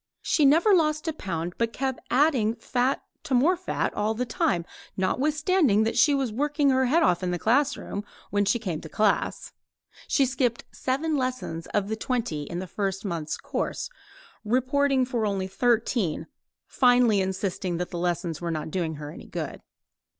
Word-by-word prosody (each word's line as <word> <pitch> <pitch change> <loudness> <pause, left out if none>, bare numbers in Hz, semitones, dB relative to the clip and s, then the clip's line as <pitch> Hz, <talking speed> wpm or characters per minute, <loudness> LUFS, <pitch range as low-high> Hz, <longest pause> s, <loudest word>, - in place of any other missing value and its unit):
She 300 - +3
never 330 +9 +5
lost 310 -2 +2
a 320 - 0
pound 175 - -4
but 230 -1 +1
kept 265 -1 -2
on - - -27
adding 250 -5 +3
fat 250 +2 0 0.2
to 285 -5 -1
more 305 +9 +4
fat 365 +1 -2
all 215 +1 0
the 250 +3 -1
time, 175 -7 0 0.3
notwithstanding 295 - +2
that 225 - -1
she 285 +5 +5
was 265 -5 -1
working 290 +2 +2
her 260 0 +3
head 320 +7 +3
off 175 - +3
in 180 - -1
the 175 - -1
classroom 240 - 0 0.3
when 205 0 +2
she 200 +3 +2
came 180 -9 -4
to 160 - -9
class. 210 +3 0 0.5
She 275 - +3
skipped 250 -2 0
seven 295 +4 -1
lessons 255 -11 -3
of 205 -1 -1
the 220 - -2
twenty 220 - -2
in 170 - -5
the 185 - -3
first 195 +2 -3
month's 165 -5 -3
course, - - -3 0.5
reporting 260 +3 +2
for 245 -3 -2
only 200 -3 0
thirteen, 220 -5 0 0.4
finally 245 -5 +4
insisting 190 -2 -2
that 180 +1 -4
the 175 - -4
lessons 175 -2 -2
were 170 - -2
not 155 -1 -3
doing 165 -3 -2
her 150 0 -7
any - - -11
good. - - -5
230 Hz, 175 wpm, -26 LUFS, 185-270 Hz, 0.5 s, never